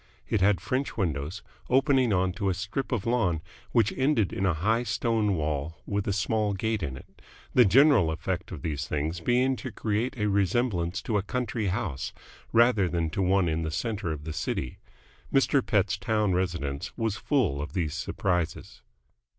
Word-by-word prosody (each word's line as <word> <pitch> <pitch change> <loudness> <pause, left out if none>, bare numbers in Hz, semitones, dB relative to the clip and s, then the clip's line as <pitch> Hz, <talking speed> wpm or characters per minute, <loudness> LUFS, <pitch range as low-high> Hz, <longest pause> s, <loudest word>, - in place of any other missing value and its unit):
It 105 - 0
had 100 0 +4
French 130 0 -2
windows, 80 -1 -2 0.3
opening 130 -2 +3
onto 95 +1 +1
a 95 - 0
strip 105 +8 -4
of 115 -6 -1
lawn 105 -10 +1 0.3
which 110 -3 +3
ended 130 -7 +2
in 95 - 0
a 90 - +2
high 110 +8 +1
stone 115 -4 0
wall 75 0 -2
with 100 -1 -2
a - - +1
small 105 +1 0
gate 110 +2 -1
in 65 -5 -3
it, - - -16 0.3
the 125 - +7
general 120 - +5
effect 90 +5 -3
of 80 -7 -7
these 75 -1 -2
things 80 +3 -2
being 125 +8 +2
to 130 - -6
create 115 +5 -2
a 105 - 0
resemblance 100 -2 0
to 105 -3 0
a - - 0
country 115 0 -2
house 95 - -2 0.4
rather 115 -5 +4
than 85 -2 -1
to 95 - -1
one 95 -1 +3
in 80 0 0
the 80 - -2
centre 100 +1 -2
of 75 -2 -5
the 80 0 -5
city. 70 -5 -3 0.5
Mr. 135 0 +3
Pett's 105 -1 +1
town 105 0 +1
residence 85 -6 -2
was 110 -3 0
full 105 - 0
of 75 - -6
these 85 -6 -1
surprises. 90 -4 -2
100 Hz, 175 wpm, -27 LUFS, 85-115 Hz, 0.5 s, the